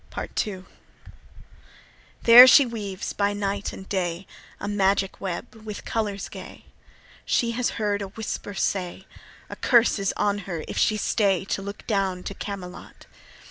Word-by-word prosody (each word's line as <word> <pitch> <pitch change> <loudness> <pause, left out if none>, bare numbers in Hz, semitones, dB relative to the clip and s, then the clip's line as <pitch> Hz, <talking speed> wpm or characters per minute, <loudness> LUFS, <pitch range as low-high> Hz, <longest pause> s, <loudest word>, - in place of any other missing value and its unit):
Part - - -3
II. 190 -3 -7 1.6
There 240 +2 +11
she 275 +1 +8
weaves 205 -5 -5
by 205 0 0
night 200 0 -2
and 190 - -10
day 180 -1 -2 0.3
A - - -5
magic 195 -1 0
web 190 +6 -5
with 215 -2 -9
colours 205 -3 -2
gay. - - -11 0.6
She 235 -1 +1
has 245 +1 0
heard 205 -2 -1
a 200 - -4
whisper 205 0 -6
say, 185 0 -2 0.4
A - - -8
curse 235 -3 +3
is 195 -1 0
on 205 0 +1
her 165 -3 -4
if - - -3
she 215 - +2
stay 195 -3 +1
To 195 - -2
look 200 +1 -8
down 195 -4 -1
to - - -5
Camelot. 195 -3 -8
200 Hz, 150 wpm, -25 LUFS, 190-215 Hz, 1.6 s, There